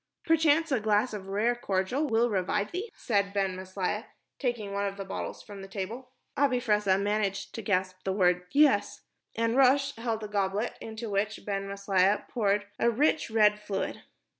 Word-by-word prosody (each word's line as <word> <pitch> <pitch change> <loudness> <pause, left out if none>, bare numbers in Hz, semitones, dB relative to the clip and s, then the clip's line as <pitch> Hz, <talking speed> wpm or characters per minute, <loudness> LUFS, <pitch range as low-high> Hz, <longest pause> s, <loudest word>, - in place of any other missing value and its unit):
"Perchance 325 -1 +3
a 260 - +3
glass 215 +3 +1
of 195 -2 -6
rare 210 +5 +1
cordial 240 +6 -1
will 230 0 +3
revive 200 +1 0
thee," 385 +6 -4
said 200 -4 0
Ben 195 -2 0
Maslia, 190 +4 -3 0.3
taking 235 -6 -2
one 200 0 0
of 195 0 -5
the 195 - -5
bottles 190 - -5
from 200 -1 -10
the 195 - -8
table. 220 +6 -6 0.3
Abi 270 -3 +2
Fressah 210 -5 +2
managed 200 -1 -1
to 225 - -5
gasp 185 -3 0
the 190 - -1
word 180 -2 +2
"Yes," 290 -1 +3 0.3
and 230 +1 +1
Rosh 275 +1 +4
held 225 -1 -2
a - - -4
goblet 205 +2 -1
into 220 0 -6
which 205 +2 -1
Ben 195 -1 -2
Maslia 200 0 +1
poured 205 -3 +1
a 235 - +4
rich, 290 +5 +1
red 210 -2 +4
fluid. 205 -2 -4
210 Hz, 175 wpm, -29 LUFS, 195-240 Hz, 0.3 s, Rosh